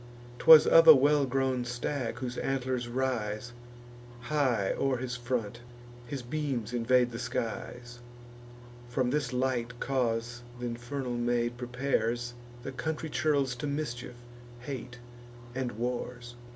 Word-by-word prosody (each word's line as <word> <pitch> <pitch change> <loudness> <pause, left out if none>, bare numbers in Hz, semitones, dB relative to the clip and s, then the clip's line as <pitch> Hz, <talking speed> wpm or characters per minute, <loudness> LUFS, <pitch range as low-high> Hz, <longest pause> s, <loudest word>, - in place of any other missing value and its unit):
'Twas 160 -2 +9
of 165 0 +7
a 160 - +12
well 145 +1 +3
grown 130 -1 0
stag, 120 0 -3
whose 125 -1 -4
antlers 130 -2 -1
rise 120 -3 -2 0.7
High 125 -7 +1
o'er 135 -2 +1
his 125 0 -4
front; 120 -2 -3 0.5
his 135 0 -5
beams 125 -4 -3
invade 125 +1 +3
the 115 - -6
skies. 120 0 -4 0.9
From 125 0 0
this 145 -3 0
light 125 -1 -1
cause 120 -2 -1 0.2
th' - - -8
infernal 120 +1 -4
maid 120 0 0
prepares 120 -1 -1 0.3
The 135 - -5
country 160 +3 -3
churls 140 -5 +1
to 145 - -3
mischief, 125 -4 -4 0.5
hate, 125 -2 -6 0.6
and 130 -1 -3
wars. 120 +1 -4
125 Hz, 125 wpm, -30 LUFS, 120-135 Hz, 0.9 s, a